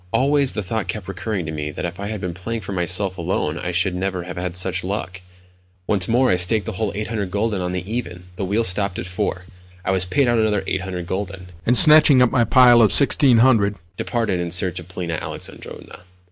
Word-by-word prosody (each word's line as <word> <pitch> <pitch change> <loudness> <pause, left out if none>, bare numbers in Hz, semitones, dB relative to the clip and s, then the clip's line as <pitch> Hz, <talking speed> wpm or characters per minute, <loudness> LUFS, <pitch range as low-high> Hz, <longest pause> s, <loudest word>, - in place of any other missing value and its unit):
Always 135 +3 +2
the 105 - -3
thought 110 +3 -3
kept 105 -4 -5
recurring 100 -1 -4
to 80 - -5
me 75 -1 -4
that 75 - -5
if 85 +2 -6
I 100 - -4
had 105 -1 -4
been 90 -2 -4
playing 110 +6 -5
for 100 - -7
myself 95 +1 0
alone 85 -2 -2
I 90 - -4
should 90 +2 +1
never 90 0 -3
have 90 0 -8
had 90 0 -4
such 95 0 0
luck. 95 -1 -4 0.6
Once 95 -3 +2
more 125 +3 +2
I 90 - +2
staked 95 +3 +3
the - - -3
whole 100 +2 -2
800 105 -2 -3
gülden 105 0 -1
on 90 0 -3
the 90 -1 -4
"even." 100 -6 -5
The 95 - -4
wheel 105 +5 0
stopped 100 -1 +1
at - - -4
4. 90 -1 -3 0.4
I - - 0
was 95 -1 +2
paid 135 +8 +1
out 120 -1 +2
another 105 -3 +1
800 95 -2 -4
gülden, 95 0 -5 0.2
and, 125 - +4
snatching 150 -4 +6
up 125 -2 +4
my 125 -3 +3
pile 120 +1 +6
of 110 - +5
1600, 120 -7 +3 0.2
departed 115 -7 -2
in 85 -1 -3
search 90 0 0
of 90 - -11
Polina 85 -3 -4
Alexandrovna. - - -8
95 Hz, 215 wpm, -21 LUFS, 90-115 Hz, 0.6 s, snatching